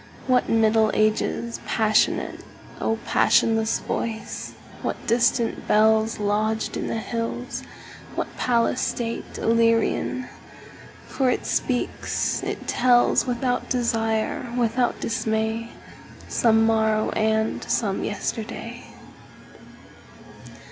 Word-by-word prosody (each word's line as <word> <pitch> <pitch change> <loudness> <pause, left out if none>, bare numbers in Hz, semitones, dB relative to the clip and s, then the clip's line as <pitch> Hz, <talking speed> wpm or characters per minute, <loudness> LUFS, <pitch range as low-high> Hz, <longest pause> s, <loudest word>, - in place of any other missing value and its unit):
What 255 -1 +2
Middle 220 -1 +4
Ages 215 +2 0
passionate,O 220 0 0
passionless 225 -1 +3
voice! 220 -1 -4 0.3
What - - -2
distant 235 0 +1
bellsLodged 220 0 +2
in - - -3
the - - -2
hills, 230 +1 -4 0.5
what - - -4
palace 240 0 +1
stateIllyrian! 230 +1 0 0.8
For 265 -2 0
it - - -1
speaks, 250 -2 -1
it - - -5
tells, 245 0 +3
Without 250 0 -1
desire, 225 -1 -1
without 240 +1 +1
dismay, 220 0 -1 0.6
Some 225 -1 +3
morrow 220 -1 +2
and 220 0 0
some 200 -4 0
yesterday. 215 +1 -4
225 Hz, 85 wpm, -24 LUFS, 220-235 Hz, 0.8 s, Middle